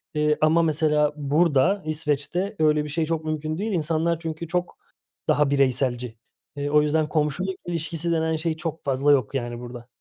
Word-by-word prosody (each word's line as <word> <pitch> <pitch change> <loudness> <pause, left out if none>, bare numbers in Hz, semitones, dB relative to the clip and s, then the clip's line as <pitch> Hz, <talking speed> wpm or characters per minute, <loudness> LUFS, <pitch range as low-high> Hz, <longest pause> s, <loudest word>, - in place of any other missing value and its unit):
eee, 150 0 +2
ama 160 +2 +4
mesela 150 -2 +2
burada 155 +5 +2
İsveç'te 155 +5 -2
öyle 150 -1 +3
bir 150 - -6
şey 160 +2 0
çok 160 -1 -2
mümkün 155 0 -2
değil. 215 +2 -2
İnsanlar 165 0 0
çünkü 160 0 -5
çok 180 +1 -2 0.5
daha 150 -1 +3
bireyselci. 125 -4 0 0.4
Eee, 145 0 -2
o 150 0 +5
yüzden 150 0 +1
komşuluk 160 +5 -1
ilişkisi 165 0 -2
denen 160 0 +1
şey 160 0 -2
çok 160 -1 -5
fazla 140 +2 +2
yok 135 -3 +2
yani 120 -2 -3
burada. 120 0 -9
155 Hz, 170 wpm, -24 LUFS, 145-165 Hz, 0.5 s, o